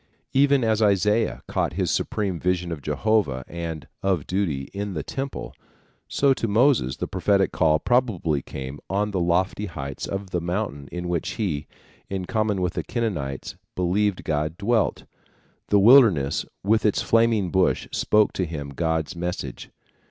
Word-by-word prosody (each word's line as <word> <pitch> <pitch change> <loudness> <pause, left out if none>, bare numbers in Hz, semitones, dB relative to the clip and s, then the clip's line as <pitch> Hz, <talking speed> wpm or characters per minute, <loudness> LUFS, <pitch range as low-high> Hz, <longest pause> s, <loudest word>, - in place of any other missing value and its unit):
Even 140 -1 +4
as 110 -1 +2
Isaiah 105 +2 +2
caught - - -1
his - - 0
supreme 95 -5 -1
vision 90 0 0
of 80 -3 -5
Jehovah 95 - 0
and 85 -2 -5
of 95 -6 0
duty 90 -8 -1
in 100 -1 -4
the 75 - -3
temple, 135 0 -5 0.5
so 140 -1 +3
to 115 - -2
Moses 110 - +3
the - - -2
prophetic 95 +1 +1
call 80 -2 +3
probably 95 - +1
came 65 +2 -7
on 105 +2 0
the 95 - -1
lofty 90 +4 +1
heights 70 -6 -6
of 95 -1 -5
the 90 - -1
mountain 85 -5 -3
in 90 0 -4
which 85 -2 -2
he, 80 -9 -2 0.4
in 95 -2 -3
common 105 -2 0
with 90 -1 -1
the - - -2
Kenites, 80 - -3 0.2
believed 95 +2 +1
God 75 +1 -1
dwelt. 110 -2 +1 0.6
The 105 - +4
wilderness 100 - +5 0.2
with 110 +3 +2
its 105 - +2
flaming 115 -5 +2
bush 95 -1 +2
spoke 105 -1 +2
to 95 - -1
him 75 -3 -5
God's 80 +3 -1
message. 90 +1 -5
95 Hz, 155 wpm, -24 LUFS, 80-105 Hz, 0.6 s, wilderness